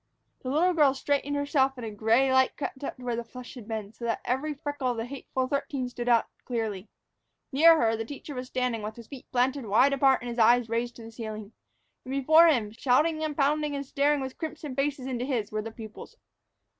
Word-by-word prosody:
The 255 - -6
little 340 +7 +3
girl 290 -5 +4
straightened 285 +1 -1
herself 285 -2 +2
and 240 - -6
a 220 - -5
gray 230 +6 +2
light 260 0 +3
crept 280 -1 -5
up - - -4
to 255 - -12
where 240 -1 -1
the 235 - -3
flush 250 +2 -10
had 240 -5 -11
been, 220 -2 -5
so 235 - -13
that 230 - -1
every 265 +5 -1
freckle 290 -1 -3
of 245 - -2
the 225 - -2
hateful 260 0 -3
thirteen 275 -2 -2
stood 245 0 -4
out 235 -2 +4 0.2
clearly. 220 -5 -3 0.6
Near 325 +4 +6
her, 225 -1 +2
the 225 - -3
teacher 285 +4 -8
was 250 -1 -5
standing, 250 -3 -1
with 215 +1 -5
his 235 - -11
feet 265 +2 -12
planted 255 0 0
wide 255 +7 +4
apart 270 -1 +3
and 245 - -5
his 235 - -5
eyes 235 +1 +5
raised 235 +1 -2
to 230 - -11
the 225 - -10
ceiling. 215 -2 -7 0.5
And 255 - -8
before 315 +5 +6
him, 235 -10 +2
shouting 295 +7 +1
and 305 -2 -3
pounding 295 +1 +1
and 280 0 -4
staring 285 +1 +1
with 265 -1 -6
crimson 310 -4 -5
faces 275 -1 -1
into 250 -2 -3
his, 245 -6 -2
were 215 0 -2
the 225 - -6
pupils. 220 -1 -11
255 Hz, 225 wpm, -28 LUFS, 230-280 Hz, 0.6 s, Near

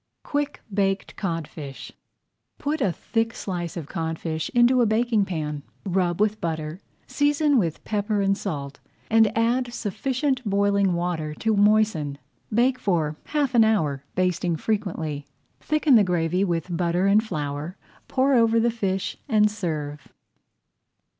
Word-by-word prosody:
QUICK 290 0 -2
BAKED 195 -1 0
CODFISH 160 -6 -5 0.7
Put 300 +1 -2
a 195 - +2
thick 225 +5 -2
slice 175 -3 -4
of 165 - -4
codfish 160 0 -3
into 245 +1 +5
a 235 - +4
baking 220 -1 +2
pan. 150 -5 -3 0.2
Rub 180 -2 0
with 215 0 +1
butter, 160 +1 -3 0.2
season 290 -1 +2
with 165 -6 -2
pepper 210 0 -1
and 195 0 +2
salt, 145 -9 -5 0.3
and 220 -2 +5
add 240 +2 +1
sufficient 255 +5 -1
boiling 200 -2 +2
water 170 -3 -2
to 220 +4 0
moisten. 205 -9 +3 0.3
Bake 250 +4 +2
for 160 -8 0
half 290 -4 0
an 235 -2 +6
hour, 155 -11 +1
basting 180 -2 +1
frequently. 160 -9 -2 0.3
Thicken 305 -2 +2
the 220 -4 +7
gravy 180 0 +1
with 175 -1 -1
butter 175 +2 +1
and 205 +2 +4
flour, 150 -2 -4 0.3
pour 270 +1 +2
over 230 -2 +4
the 235 +1 +2
fish, 195 -4 -2
and 210 -3 +4
serve. 155 -8 -4
200 Hz, 135 wpm, -24 LUFS, 165-225 Hz, 0.7 s, the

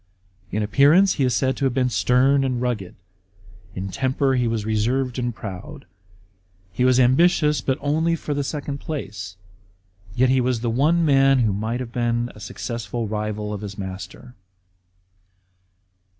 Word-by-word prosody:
In 105 +2 -1
appearance 145 - +4
he 140 - -1
is 125 -2 +1
said 130 -1 +1
to 140 - -1
have 130 -2 0
been 125 -2 +1
stern 135 +4 +3
and 130 -2 -1
rngized; 120 -7 -3 0.8
in 95 +1 -4
temper 135 +4 0
he 125 -2 +1
was 115 -2 -2
reserved 120 +4 0
and 120 0 -1
proud. 100 -5 -8 0.9
He 125 - 0
was 130 0 +4
ambitious, 150 +2 +3
but 130 +1 -1
only 160 +4 +1
for 150 -2 -4
the 145 0 -1
second 145 0 -4
place; 100 - -6 0.8
yet 130 +1 +3
he 130 0 +3
was 125 -2 0
the 120 -1 -1
one 160 +8 +2
man 135 -2 +4
who 110 -4 +1
might 110 +5 -2
have 120 -2 -6
been 120 0 -1
a - - -14
successful 115 +1 -5
rival 105 0 -3
of 105 - -5
his 100 -2 -7
master. 95 +5 -8
125 Hz, 160 wpm, -22 LUFS, 110-135 Hz, 0.9 s, appearance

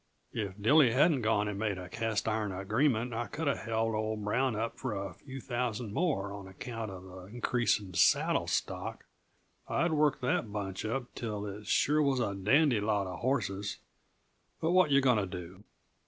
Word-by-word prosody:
If 100 -3 -4
Dilly 130 +3 +5
hadn't 145 +1 +4
gone 110 -2 +2
and 100 -1 -3
made 105 -3 -1
a 90 0 -7
cast 115 +2 -2
iron 110 -2 0
agreement 110 +5 +1
I 115 0 -2
coulda 145 +4 -1
held 115 0 -1
old 110 -1 -2
Brown 125 +3 +1
up 115 +2 -3
for 125 -5 -3
a 100 0 -4
few 135 -1 -9
thousand 120 -4 -3
more, 105 - 0
on 100 -1 -8
account 110 +3 -6
uh 95 -1 -7
the 90 0 -11
increase 120 +1 +1
in 95 -3 -10
saddle - - +3
stock. - - -3 0.6
I'd 170 0 +1
worked 150 -3 +2
that 125 -4 0
bunch 100 -1 -4
up 125 +3 -3
till 105 -3 -4
it 105 +1 -7
sure 150 +7 +3
was 140 -3 +2
a 100 - 0
dandy 120 +6 +3
lot 105 -1 +1
uh 90 -1 -5
hosses 100 -5 -1 0.8
but 160 - +1
what 185 -3 +5
yuh 140 0 +5
going 125 -5 +4
to 100 - -1
do?" 90 +2 -8
110 Hz, 185 wpm, -31 LUFS, 100-130 Hz, 0.8 s, Dilly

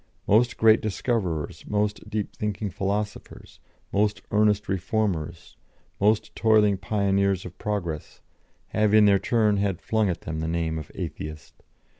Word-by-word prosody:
Most 115 +4 +3
great 110 0 +5
discoverers, 95 - -2
most 105 0 -1
deep 105 -1 -3
thinking 105 -1 -3
philosophers, 105 +2 -4 0.3
most 105 +1 +1
earnest 105 0 +2
reformers, 95 -4 -2 0.4
most 105 +2 +1
toiling 105 -3 +4
pioneers 100 -1 0
of 90 0 -9
progress, 85 -7 -4 0.5
have 105 0 +2
in 105 -1 +7
their 100 -1 +5
turn 110 -3 +2
had 100 -3 0
flung 110 -2 0
at 85 - -3
them 80 0 -5
the 80 - -2
name 80 -1 -1
of 75 - -10
Atheist. 75 0 -7
100 Hz, 135 wpm, -25 LUFS, 90-105 Hz, 0.5 s, in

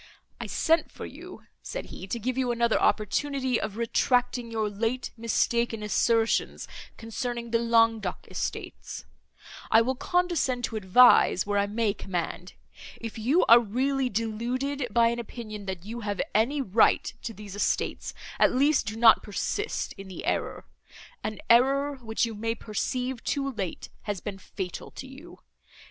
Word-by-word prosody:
"I - - -5
sent 325 +1 +1
for - - -8
you," - - -11 0.2
said - - -5
he, 190 - -8
"to 215 - -2
give 245 +3 -2
you 255 -2 0
another 235 -1 +2
opportunity 260 +4 +1
of 215 -1 -4
retracting 245 +1 +1
your 220 -2 -1
late 225 +5 -2
mistaken 230 0 0
assertions 225 +2 +1 0.3
concerning 235 +1 -4
the 230 - +3
Languedoc 230 -4 +2
estates. - - -5 0.6
I 225 - +6
will 260 +3 0
condescend 330 -5 0
to 225 - -2
advise, 210 -1 +5
where 205 0 +1
I 200 - +1
may 215 0 0
command.—If 190 +4 -7
you 270 +11 +3
are 235 +1 +9
really 255 +4 0
deluded 245 +5 -2
by 230 +1 +4
an 235 0 -2
opinion, 215 -3 -7
that 190 -1 -5
you 230 +3 -6
have 205 -3 -3
any 270 +7 +2
right 220 0 +3
to - - -4
these 205 -2 -9
estates, 205 - -1 0.2
at - - +5
least, 285 +3 +3
do 215 - -3
not 225 0 +6
persist 410 - -3
in 195 - -8
the 190 - -7
error—an 325 - -5
error, 275 +4 +4
which 225 -2 -1
you 230 - -5
may 225 +2 -2
perceive, 250 +3 -3
too 275 -1 -1
late, 195 -8 -5 0.2
has 205 -2 -1
been 195 +1 -6
fatal 185 -1 -6
to - - -9
you. 280 +7 -12
230 Hz, 150 wpm, -27 LUFS, 215-255 Hz, 0.6 s, are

